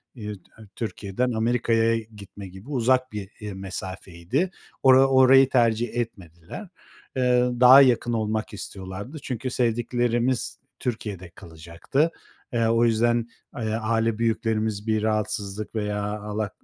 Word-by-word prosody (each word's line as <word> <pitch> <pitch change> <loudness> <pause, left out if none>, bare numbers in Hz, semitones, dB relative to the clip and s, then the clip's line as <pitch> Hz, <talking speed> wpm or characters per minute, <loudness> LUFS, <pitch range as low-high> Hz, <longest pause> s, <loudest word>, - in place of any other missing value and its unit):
iii, 105 -3 -6
T - - -28 0.2
Türkiye'den 115 +2 -2
Amerika'ya 115 0 +1
gitme 100 -3 -11
gibi 95 +8 -13
uzak 130 -1 +1
bir, 105 -2 -6
iii, 105 -2 -6
mesafeydi. 95 - -4 0.3
Ora 130 0 +7
orayı 130 0 +6
tercih 120 -2 +2
etmediler. 95 - -6 0.5
Iıı, 125 -1 +2
daha 130 +2 +9
yakın 120 -2 +3
olmak 110 -1 -2
istiyorlardı. 100 +8 -7
Çünkü 130 0 -3
sevdiklerimiz 120 +1 0 0.2
Türkiye'de 105 -7 -4
kalacaktı. 85 - -3 0.4
Eee, 115 -1 +2
o 115 +1 +3
yüzden 115 +1 +2 0.3
ay 110 -4 -2
aile 115 0 0
büyüklerimiz 110 -2 -1
bir 110 -1 +1
rahatsızlık 105 -1 -2
veya 105 -1 -2 0.2
Allah 105 0 -3
115 Hz, 120 wpm, -25 LUFS, 105-125 Hz, 0.5 s, daha